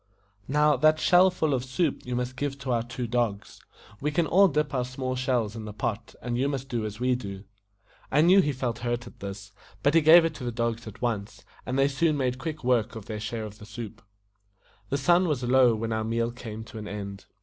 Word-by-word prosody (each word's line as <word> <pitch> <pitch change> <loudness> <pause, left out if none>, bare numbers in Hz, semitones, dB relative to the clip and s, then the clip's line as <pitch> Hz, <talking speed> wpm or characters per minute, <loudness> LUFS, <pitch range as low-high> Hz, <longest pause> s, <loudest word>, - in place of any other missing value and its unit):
Now, 150 +1 +3
that 155 +4 +4
shell 180 +3 +6
full 160 -5 0
of 125 -2 0
soup 135 +4 -1
you 125 - -2
must 125 +1 -2
give 140 +1 -3
to 135 -2 -3
our 120 -1 +2
two 125 +2 -5
dogs. 115 -4 -2 0.4
We 150 - -1
can 160 +3 +1
all 195 +6 +5
dip 150 -3 -1
our 125 -2 +1
small 130 +1 -4
shells 125 -4 0
in 110 -1 -6
the 105 - -7
pot, 105 +1 -4
and 120 0 -2
you 135 +2 +1
must 135 -1 -4
do 115 -4 -2
as 105 +1 -8
we 125 +1 +2
do." 100 -6 -5 0.7
I 150 - +4
knew 185 +4 +6
he 150 - 0
felt 125 -3 -3
hurt 120 0 -2
at 120 - -13
this, 100 0 -7 0.3
but 145 - +3
he 165 - +6
gave 165 +2 +8
it 165 - -1
to 145 - -9
the 120 - -2
dogs 115 0 -2
at 110 - -10
once, 110 -2 -3 0.2
and 130 +1 -1
they 135 0 +4
soon 150 +2 +1
made 130 -2 -1
quick 155 +1 -5
work 120 -2 +1
of 110 -3 -8
their 110 -1 -5
share 110 +1 -4
of 105 0 -10
the 105 - -10
soup. 110 0 -8 0.9
The 140 - 0
sun 175 +6 +3
was 145 -6 -1
low 125 -1 +5
when 115 +1 -2
our 110 0 -1
meal 115 +1 -1
came 110 -2 -8
to 110 0 -9
an 105 - -7
end. 100 -1 -7
125 Hz, 240 wpm, -27 LUFS, 115-145 Hz, 0.9 s, gave